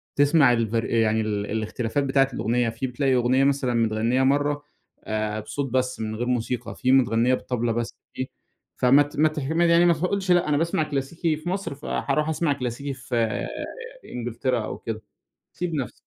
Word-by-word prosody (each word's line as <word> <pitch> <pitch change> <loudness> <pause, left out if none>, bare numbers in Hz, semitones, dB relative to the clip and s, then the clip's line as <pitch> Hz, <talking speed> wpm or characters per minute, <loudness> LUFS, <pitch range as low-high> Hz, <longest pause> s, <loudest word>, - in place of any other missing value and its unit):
تسمع 145 -3 +5
الفر 115 -1 0
يعني 110 -1 +2
ال 105 -1 -2
الاختلافات 115 +5 -1
بتاعة 135 0 +3
الأغنية، 120 +1 0
في 115 +4 -3
بتلاقي 130 +1 +1
أغنية 125 +2 +3
مثلًا 135 -3 +1
متغنّية 115 +3 +1
مَرّة 145 +2 +1 0.4
آآ، 110 0 -2
بصوت 135 +4 -4
بس 130 -1 0
من 110 0 -3
غير 120 +2 -3
موسيقى، 125 0 -2
في 130 - +1
متغنّية 125 -1 +4
بالطبلة 120 -2 -1
بس 115 0 -2 0.2
في 130 - -3 0.5
فمت 140 +4 +4
مت 155 0 +2
ه - - -4 0.2
يعني 170 +1 +5
ما 170 - +5
ما 155 - -7
تقولش 185 +1 0
لأ 175 -3 +3
أنا 145 - +2
باسمع 165 0 +1
كلاسيكي 150 +2 -2
في 165 +3 -5
مصر 190 -6 -3
فهاروح 150 +2 -1
أسمع 160 -1 +1
كلاسيكي 135 +1 -4
في 130 -1 -6 0.9
إنجلترا 120 -1 -2
أو - - -5
كده، 110 -1 -5 0.5
سيب 175 -2 -3
نَفسك. 135 -4 -3
130 Hz, 170 wpm, -24 LUFS, 115-145 Hz, 0.9 s, تسمع